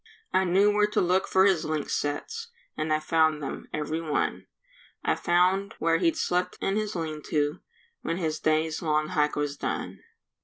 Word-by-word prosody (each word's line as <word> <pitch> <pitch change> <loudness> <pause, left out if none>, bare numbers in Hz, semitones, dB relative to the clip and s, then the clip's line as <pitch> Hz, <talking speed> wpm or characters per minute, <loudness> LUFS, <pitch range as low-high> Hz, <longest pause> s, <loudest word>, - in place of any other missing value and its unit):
I 190 0 +3
knew 195 +4 +4
where 210 0 +3
to 210 - 0
look 185 +1 +2
for 190 0 +4
his 190 -5 +3
lynx 155 -2 -2
sets, 450 - -3 0.3
And 155 0 -2
I 155 - +3
found 155 0 +2
them, - - -5
every 155 +2 -2
one; 155 -3 -1 0.6
I - - +3
found 185 +3 +2
where 165 0 +2
he'd 330 -1 +2
slept 180 - 0
in 195 - 0
his 215 -1 -2
lean 155 -3 -3
to 150 +2 0 0.4
When 165 - -2
his 155 -3 -2
day's 155 0 +1
long 155 -1 +1
hike 150 -4 +1
was 145 -1 -2
done. - - -4
165 Hz, 180 wpm, -27 LUFS, 155-190 Hz, 0.6 s, knew